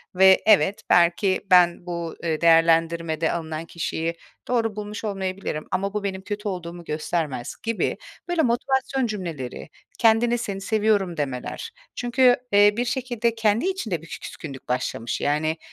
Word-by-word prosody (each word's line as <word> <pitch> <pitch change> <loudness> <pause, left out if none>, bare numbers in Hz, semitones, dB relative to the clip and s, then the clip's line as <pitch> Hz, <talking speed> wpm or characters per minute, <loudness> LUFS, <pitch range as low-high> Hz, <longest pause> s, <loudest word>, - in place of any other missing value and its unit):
ve 190 0 +6
evet, 205 -2 +4
belki 175 +3 +3
ben 175 -1 +5
bu, 170 -2 -4
eee, 160 -1 -1
değerlendirmede 165 -1 +3
alınan 160 -1 -4
kişiyi 165 0 -3 0.3
doğru 225 -4 0
bulmuş 210 +1 -6
olmayabilirim 190 -6 -3
ama 195 +2 -1
bu 210 -1 -2
benim 190 -1 -3
kötü 205 +2 -5
olduğumu 175 -2 -5
göstermez." 155 -5 -3
gibi 230 -1 -1 0.3
böyle 350 -2 +1
motivasyon 265 +1 0
cümleleri, 165 - -5 0.3
kendine, 235 +1 +4
"Seni 195 -3 -4
seviyorum." 205 -4 +1
demeler. 140 - -4 0.2
Çünkü, 245 0 +4 0.2
eee, 205 0 +6
bir 245 - 0
şekilde 240 -3 -1
kendi 220 +4 +1
içinde 220 - -3
bir 165 - -13
küskünlük 135 -4 -9
başlamış, 125 -2 -2
yani, 155 +2 0
190 Hz, 135 wpm, -24 LUFS, 165-220 Hz, 0.3 s, ve